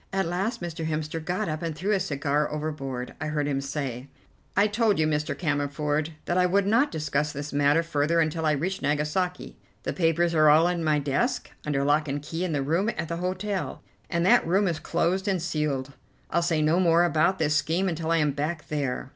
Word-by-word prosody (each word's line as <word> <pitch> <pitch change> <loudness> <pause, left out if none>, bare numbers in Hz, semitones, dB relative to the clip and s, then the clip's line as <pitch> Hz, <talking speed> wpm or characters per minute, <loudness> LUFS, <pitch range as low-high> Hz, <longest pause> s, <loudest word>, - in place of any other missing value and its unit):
At 195 -1 0
last 185 +5 -2
Mr. 165 -2 -4
Hemster 155 0 -3
got 185 +4 -2
up 155 -1 -3
and 165 -2 -3
threw 190 +7 -1
his 195 -3 +1
cigar 145 +1 0
overboard. 145 -5 -4
I 155 - -2
heard 150 -1 -1
him 135 -1 -1
say: 135 -2 -4 0.5
"I 200 - +6
told 215 0 +2
you, 155 - +2
Mr. 150 -1 -1
Cammerford, 145 0 -1 0.2
that 175 +1 +1
I 180 - +4
would 195 +2 +2
not 230 +8 +3
discuss 150 -2 -1
this 145 +1 -6
matter 145 +3 +3
further 165 +1 +1
until 160 0 0
I 155 - +3
reached 175 +7 -2
Nagasaki. 150 +5 -1 0.3
The - - -2
papers 170 0 +2
are 155 -2 +5
all 155 +3 +6
in 175 -2 -1
my 155 -1 +2
desk 145 - -1 0.2
under 140 -2 +1
lock 150 +2 +2
and 140 +1 -2
key 160 +4 -4
in 180 - -1
the 145 -3 0
room 170 +9 +1
at 160 - -3
the 170 - -2
hotel, 185 +2 -3 0.3
and 170 -1 0
that 240 -2 +5
room 195 +4 +3
is 165 -3 -1
closed 180 +4 0
and 190 -2 +1
sealed. 150 -5 -2 0.4
I'll 170 - +2
say 165 -2 +1
no 160 +4 +3
more 170 -1 +4
about 170 +3 +2
this 150 -3 +1
scheme 165 +5 +1
until 165 -2 -2
I 165 - +3
am 150 -2 +2
back 150 +3 -3
there." 140 -3 -2
160 Hz, 215 wpm, -26 LUFS, 150-175 Hz, 0.5 s, I